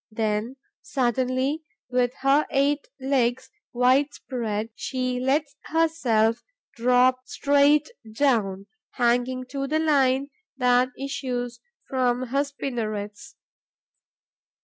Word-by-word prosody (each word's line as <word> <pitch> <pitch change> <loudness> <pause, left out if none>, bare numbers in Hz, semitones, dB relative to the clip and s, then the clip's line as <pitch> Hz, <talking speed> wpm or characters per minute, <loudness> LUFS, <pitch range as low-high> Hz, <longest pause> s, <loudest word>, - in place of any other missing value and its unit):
Then, 220 +2 -2 0.3
suddenly, 260 +1 0 0.3
with 250 -1 +2
her 275 +2 +3
eight 280 +1 +1
legs 260 -2 0 0.2
wide 255 +4 +3
spread, 225 -4 -4
she 255 +1 -2
lets 285 +3 0
herself 250 -9 +1 0.3
drop 250 +2 +3
straight 285 +1 +3 0.2
down, 215 -7 +1 0.3
hanging 245 +1 +1
to 275 -1 -3
the 310 +3 +1
line 280 -3 +2 0.3
that 250 -1 +3
issues 245 -3 -4 0.3
from 255 -1 0
her 275 +3 +2
spinnerets. 235 -1 -5
255 Hz, 95 wpm, -25 LUFS, 240-280 Hz, 0.3 s, her